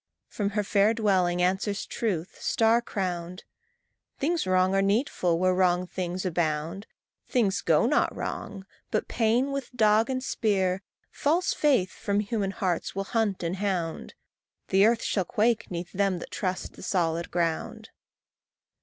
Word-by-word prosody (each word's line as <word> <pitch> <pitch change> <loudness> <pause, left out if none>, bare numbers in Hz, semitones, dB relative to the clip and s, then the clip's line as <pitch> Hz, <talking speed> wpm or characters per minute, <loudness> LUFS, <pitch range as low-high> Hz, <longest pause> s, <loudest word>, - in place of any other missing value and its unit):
From 205 -2 -2
her 210 - +2
fair 205 +2 +3
twilight 185 -5 +2
answers 190 +3 0
Truth, 185 -7 -3
star 225 +1 +3
crowned, 180 -5 -4 0.7
"Things 325 - 0
wrong 185 0 +3
are 195 - +3
needful 195 - +1
where 185 +1 +2
wrong 180 -1 +2
things 180 +1 -4
abound. 165 +2 -1 0.4
Things 205 -7 +1
go 160 +4 +3
not 285 +5 +2
wrong; 195 -2 -5 0.2
but 215 - -1
Pain, 240 +4 +1
with 275 -2 -4
dog 220 +1 +4
and 255 -1 -2
spear, 195 -7 0 0.3
False 335 +6 +1
faith 255 -12 +2
from 200 0 -1
human 205 -1 -1
hearts 190 -5 -2
will 195 - -1
hunt 205 -3 -1
and 170 +3 -2
hound. 185 -5 -3 0.5
The 195 +2 +5
earth 230 0 +1
shall 195 - 0
quake 220 +5 +1
'neath 175 0 -5
them 195 -1 +1
that - - -9
trust 185 -2 -3
the - - -13
solid 170 -2 -1
ground." 170 -2 -2
195 Hz, 145 wpm, -27 LUFS, 180-220 Hz, 0.7 s, The